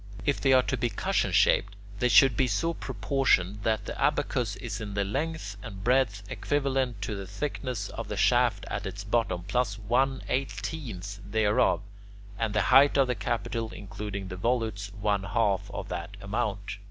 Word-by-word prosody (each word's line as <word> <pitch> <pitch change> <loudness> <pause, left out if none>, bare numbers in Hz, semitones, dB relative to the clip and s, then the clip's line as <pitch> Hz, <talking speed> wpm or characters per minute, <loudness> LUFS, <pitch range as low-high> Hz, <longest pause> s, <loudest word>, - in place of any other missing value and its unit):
If 145 - +1
they 135 - +3
are 130 -1 +6
to 130 - -1
be 120 0 0
cushion 100 - 0
shaped, 100 +1 +3 0.2
they 125 - +2
should 125 +2 +7
be 130 - +2
so 165 +10 0
proportioned 105 - +1
that 110 -1 0
the - - -6
abacus - - +1
is - - -5
in 100 -2 -5
length 105 +2 -2
and 100 -4 -8
breadth 120 -5 +2
equivalent 135 -5 -1
to 105 - -3
the 100 -1 -6
thickness 125 -1 -3
of - - -6
the - - -4
shaft - - +3
at - - -3
its 100 - -6
bottom 105 -4 0
plus 110 +2 0
one 130 +5 +1
eighteenth 105 - -3
thereof, 105 -3 +2 0.6
and 110 -2 -1
the - - +4
height 140 +1 +7
of 135 - +5
the 125 - 0
capital, 115 -1 -2
including 100 -1 -6
the 90 - -6
volutes, 110 -2 -1
one 100 -1 +1
half 100 -1 0
of - - -6
that 90 +3 -5
amount. 100 -1 -3
110 Hz, 170 wpm, -28 LUFS, 100-130 Hz, 0.6 s, should